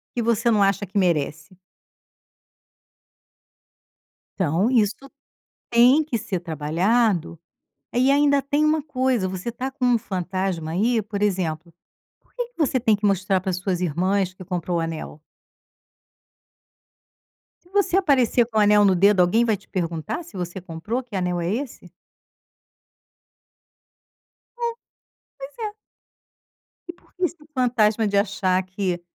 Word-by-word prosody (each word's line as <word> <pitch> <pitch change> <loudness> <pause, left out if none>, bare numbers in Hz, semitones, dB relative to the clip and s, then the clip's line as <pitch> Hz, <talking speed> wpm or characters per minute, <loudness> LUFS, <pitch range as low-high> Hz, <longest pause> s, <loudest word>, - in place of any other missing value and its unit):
que 240 - 0
você 230 0 +1
não 215 -3 +4
acha 195 +1 +1
que 200 +2 -6
merece? 160 -1 0 2.8
Então, 185 +4 +1
isso 220 -5 +3 0.8
tem 250 +6 +5
que 285 -6 -2
ser 195 -4 -3
trabalhado, 170 - 0 0.6
e 255 +3 +3
ainda 285 0 +3
tem 285 +2 0
uma 305 -1 +2
coisa, 255 -8 0
você 190 +5 -4
tá 255 +3 -5
com 265 -2 -2
um 245 -1 +4
fantasma 185 -4 -3
aí, 220 +6 +1
por 205 0 -6
exemplo, 175 -4 -1 0.5
porque 485 -1 -6
que - - -39
você 275 -5 +1
tem 225 -3 +3
que 205 +1 -3
mostrar 195 -1 +2
para 190 - -3
as 180 - -2
suas 185 -1 -2
irmãs 185 +3 0
que 185 - -11
comprou 175 -1 -2
o - - 0
anel? 160 -2 -6 2.4
Se 350 - -25
você 385 -2 +2
aparecer 260 - +3
com 225 -1 -5
o - - +5
anel 210 0 +5
no 190 -2 +4
dedo 200 +2 +4
alguém 180 +6 +4
vai 220 -3 +1
te 200 - -24
perguntar, 170 - -3
se 315 - -12
você 180 +1 -5
comprou, 185 +9 -4
que 235 - -22
anel 180 -2 -1
é 170 +3 -1
esse? 260 +2 -6 2.7
É, 475 -1 -1 0.7
pois 275 +1 -9
é. 415 - -7 1.1
E 345 - -6
porque 365 +1 -11
esse 345 -3 -2
fantasma 230 -4 +2
de 200 0 0
achar 195 -2 +1
que, 185 -2 -3
205 Hz, 140 wpm, -23 LUFS, 180-250 Hz, 2.8 s, tem